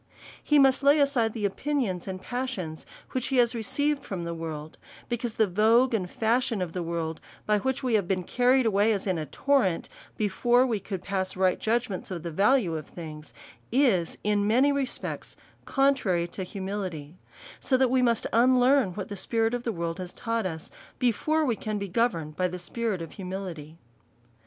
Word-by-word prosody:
He 295 - +3
must 270 -1 +5
lay 285 +2 +5
aside 255 -6 +2
the 215 -3 -2
opinions 205 -4 -1
and 185 -1 -4
passions 240 -9 -4 0.2
which 255 -2 -1
he 270 - -1
has 240 -1 +4
received 285 +6 0
from 185 -4 -5
the 170 0 -3
world, 160 -2 -6 0.3
because 240 -1 -2
the 220 - +4
vogue 225 +6 +3
and 185 -5 -1
fashion 230 +1 +1
of 180 -3 -3
the 180 - -2
world, 165 -1 -3 0.2
by 210 -1 +2
which 265 +5 -2
we 250 -2 0
have 205 -5 +2
been 185 -1 0
car 245 +7 +1
ried 260 -1 +5
away, 215 +1 +3
as 200 - -2
in 185 -4 0
a 155 - -4
torrent, 245 - +1 0.3
before 240 +5 +3
we 230 -5 0
could 195 -2 -6
pass 190 -1 -2
right 185 -1 +2
judgments 225 -3 -1
of 175 -4 -5
the 170 - -4
value 200 - +3
of 155 -2 -5
things, 155 -3 -9 0.4
is 230 - +2
in 205 -1 +1
many 255 +6 +4
respects 280 -2 -3 0.3
contrary 240 -11 +2
to 190 - -7
humility; 185 -5 -5 0.4
so 260 - +2
that 255 -1 +3
we 260 0 +3
must 235 -2 +2
unlearn 250 -3 +4
what 200 - -4
the 205 - -6
spirit 225 +4 0
of 245 - -1
the 235 - -2
world 170 -2 -3
has 180 -1 -6
taught 230 -3 -2
us, 160 -1 -6 0.3
before 305 +6 +1
we 240 -5 +1
can 215 0 -3
be 200 0 -3
governed 175 -7 0
by 185 +2 +1
the 180 0 -5
spirit 210 -1 -3
of 165 - -9
humility. 180 -5 -7
210 Hz, 190 wpm, -27 LUFS, 180-245 Hz, 0.4 s, must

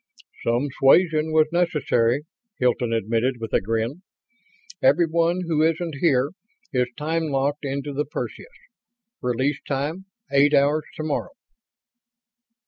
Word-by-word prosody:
"Some 120 +5 0
suasion 155 +2 +4
was 155 -1 +4
necessary," 150 -7 +1 0.3
Hilton 125 -1 +1
admitted, 115 +3 0
with 115 -1 -6
a - - +3
grin. 115 - -2 0.8
"Everyone 170 +4 +3
who 165 -3 0
isn't 165 -1 0
here 140 -4 +3 0.4
is 125 -1 +2
time 160 +2 -1
locked 145 0 -1
into 140 +1 -3
the 145 +2 -1
Perseus. 150 - -6 0.7
Release 130 +3 0
time 150 +7 -2 0.3
eight 145 +2 +5
hours 145 +2 +3
tomorrow." 155 - -3
145 Hz, 115 wpm, -23 LUFS, 130-160 Hz, 0.8 s, eight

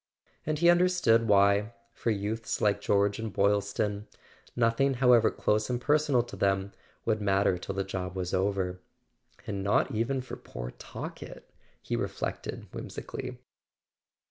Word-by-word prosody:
And 155 0 0
he 170 +3 +3
understood 175 -11 +3
why, 100 +2 +4 0.2
for - - -2
youths 110 +2 -2
like 100 -1 +2
George 100 0 +2
and 110 -1 -4
Boylston, 100 +1 0 0.5
nothing, 125 +3 +2
however 120 -3 +5
close 105 +2 0
and 125 -1 0
personal 145 -2 +2
to 120 - -10
them, 100 0 0 0.3
would 110 -1 +1
matter 100 -1 +2
till 100 - -5
the 95 - 0
job 95 -1 -5
was 90 -1 -3
over. 95 -1 0 0.6
"And 100 -2 -3
not 105 +7 +2
even 120 +5 0
for 130 - -8
poor - - -7
Talkett!" - - -9 0.3
he - - -2
reflected - - -4
whimsically. - - -6
105 Hz, 140 wpm, -29 LUFS, 100-120 Hz, 0.6 s, however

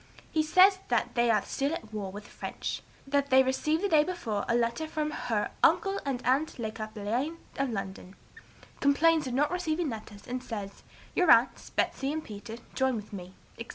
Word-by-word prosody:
He 315 - +2
says 370 +5 +6
that - - 0
they 240 0 +2
are 215 -3 +3
still 280 +3 -1
at 220 -8 -9
war 200 -3 -4
with 205 +2 -8
the - - -16
French; - - -4 0.2
that 280 0 +1
they 265 0 +7
received 305 +6 0
the - - +3
day 310 -5 +5
before 300 - -3
a 235 - +3
letter 235 +6 0
from 305 -1 -2
her 225 -7 -1
'uncle 395 -1 +4
and 265 -3 -3
aunt 275 +5 +1
Le 220 -3 -3
Cappelain 215 +8 -3 0.2
of 275 -1 +1
London;' 195 -3 -5 0.6
complains 305 +2 +4
of 250 - -3
not 295 +4 +2
receiving 345 -3 -1
letters, 210 -2 -9
and 250 +1 -4
says, 205 -5 -6 0.3
'Your 360 -3 +3
aunts, 235 -1 +5
Betsey 270 +1 0
and 315 +1 -3
Peter 220 +2 -8 0.2
join 265 -1 +1
with 210 -1 -7
me,' 185 -1 -8 0.2
etc. 230 - -7
260 Hz, 190 wpm, -29 LUFS, 215-310 Hz, 0.6 s, they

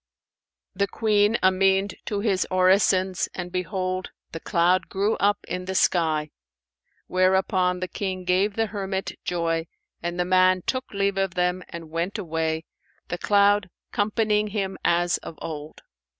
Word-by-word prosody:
The 200 +1 0
Queen 210 +1 +2
amen'd 190 +1 +3
to 205 -1 -2
his 200 -4 +1
orisons 185 0 +3
and 180 -1 -5
behold, 185 0 -2 0.2
the 165 - -6
cloud 175 +2 +2
grew 200 +3 0
up 205 +1 +2
in 180 0 -4
the 190 0 -4
sky; 155 -5 +2 0.7
whereupon 185 0 +2
the 185 - -1
King 185 0 -4
gave 190 +3 +1
the 225 - +1
hermit 195 -2 -3
joy 165 -1 -1 0.3
and 175 +1 -3
the 180 - +2
man 185 0 +4
took 255 0 -2
leave 200 -1 0
of 195 -2 -1
them 180 0 +1
and 165 -2 -9
went 170 +6 -2
away, 160 -3 -2 0.4
the 175 - -3
cloud 205 -1 +3 0.2
companying 210 0 +1
him 195 -2 -2
as 175 0 +2
of 160 - -9
old. 155 -1 -7
185 Hz, 145 wpm, -25 LUFS, 175-200 Hz, 0.7 s, man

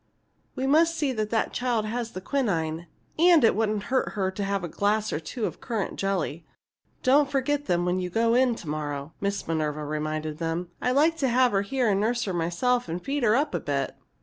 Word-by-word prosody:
"We 260 - -2
must 325 +4 +4
see 285 -4 0
that 215 -2 -2
the 225 -1 +1
child 240 -4 0
has 230 +1 -3
the 185 - -6
quinine, 170 - -1 0.3
and 340 -3 +6
it 225 - +5
wouldn't 215 -2 0
hurt 260 - +1
her 190 -2 -1
to 200 +2 -4
have 200 -1 -1
a - - -2
glass 210 +5 0
or - - -1
two 215 +8 -4
of - - -5
currant 225 -6 -3
jelly. 180 -5 -1 0.6
Don't 280 +2 +4
forget 285 +1 0
them 175 0 +1
when 180 +1 +1
you 180 -1 -3
go 230 +5 +2
in 250 -1 +3
to 170 - -10
morrow," 145 0 -4
Miss 200 0 -2
Minerva 155 -2 -1
reminded 155 +1 -3
them. 165 +1 -2
"I'd 250 - +1
like 320 +3 +4
to 270 -5 +1
have 250 +1 +4
her 195 - +2
here 245 +4 0
and 200 -2 +2
nurse 235 +2 +1
her 190 - -3
myself 175 +8 0
and 170 +2 -2
feed 280 +8 -2
her 220 -2 +4
up 290 +3 +1
a - - 0
bit. 140 -2 -2
210 Hz, 220 wpm, -26 LUFS, 170-255 Hz, 0.6 s, and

